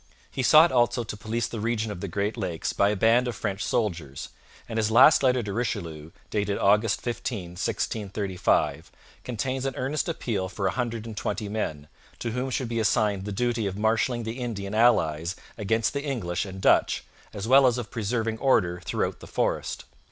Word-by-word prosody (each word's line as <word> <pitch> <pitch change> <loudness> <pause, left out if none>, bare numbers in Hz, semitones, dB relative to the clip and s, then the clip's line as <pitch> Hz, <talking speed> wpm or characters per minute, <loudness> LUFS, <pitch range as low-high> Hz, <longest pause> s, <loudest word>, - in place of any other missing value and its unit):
He - - -2
sought 155 +6 +7
also 120 -1 +2
to 110 - -6
police 110 +2 -2
the 115 - -5
region 110 0 -1
of 90 -4 -7
the 100 - -3
Great 100 +4 -2
Lakes 90 -8 -3
by 100 - +3
a 105 - 0
band 115 +5 +3
of 120 - -3
French 100 +1 -3
soldiers, 85 - -2 0.4
and 115 - -4
his 110 -1 +2
last 130 +7 +7
letter 130 -2 +3
to 100 -2 -4
Richelieu 85 -9 -3 0.2
(dated 100 -1 0
August 105 +2 +3
15, 115 -6 -4
1635) 100 +1 -1 0.3
contains 130 +2 -3
an 135 - -4
earnest 145 +6 -1
appeal 105 - -2
for 100 +1 -4
a 95 - +2
hundred 115 -3 -3
and 110 -2 -7
twenty 105 +1 -3
men, 80 -9 -3 0.3
to 115 - -3
whom 125 +3 -2
should 130 -1 -2
be 115 0 -2
assigned 105 -3 +1
the 105 - -4
duty 115 +1 0
of 95 0 -4
marshalling 115 +3 +1
the 115 +3 -5
Indian 105 -5 -4
allies 85 -7 +3 0.2
against 110 +1 0
the 140 - -2
English 105 - -2
and 95 -1 -8
Dutch, - - +3 0.3
as 100 +2 -5
well 135 +1 +7
as 125 -1 +2
of 120 -4 -5
preserving 115 0 -2
order 90 -10 +2
throughout - - -2
the - - -11
forest. - - -2
110 Hz, 190 wpm, -26 LUFS, 100-120 Hz, 0.4 s, sought